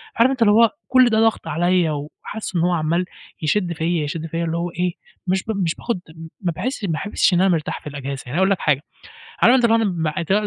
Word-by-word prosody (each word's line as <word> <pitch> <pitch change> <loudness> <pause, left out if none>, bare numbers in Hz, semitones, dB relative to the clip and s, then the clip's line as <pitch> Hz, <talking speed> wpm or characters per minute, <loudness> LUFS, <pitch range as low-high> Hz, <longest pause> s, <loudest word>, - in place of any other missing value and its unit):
عارف 235 +3 +4
أنت 260 -2 -4
اللي 215 -2 +6
هو 230 +1 +6 0.2
كل 255 -1 +5
ده 220 -1 +2
ضَغْط 225 -6 +1
عليّا 175 +1 +1
وحاسس 155 +8 -6
إن 170 - +2
هو 175 +2 +2
عَمّال 170 +1 0 0.4
يشد 175 +2 0
فيّا، 165 0 -1
يشد 155 +2 -4
فيّا 165 +1 -3
اللي 165 0 -2
هو 170 +1 -2
إيه، 175 +1 -1 0.3
مش 190 +1 +1
ب 220 - -3
مش 165 -2 0
باخُد 235 -6 -3
م 160 0 -10
ما 180 -3 0
باحِسش 245 - -3
بحا - - -2 0.2
ما - - -8
باحِسش - - +3
إن 175 - +3
أنا 190 - +4
مرتاح 165 -4 -1
في - - -10
الإجازة، 140 -1 -6 0.2
يعني - - -10
أنا - - -1
هاقول 190 +1 +3
لك 195 - +1
حاجة، 145 -3 +1 0.6
عارف 245 - +7
أنت 255 -2 +3
اللي 225 -1 +4 0.6
هو 210 +1 +2
175 Hz, 245 wpm, -21 LUFS, 160-210 Hz, 0.6 s, عارف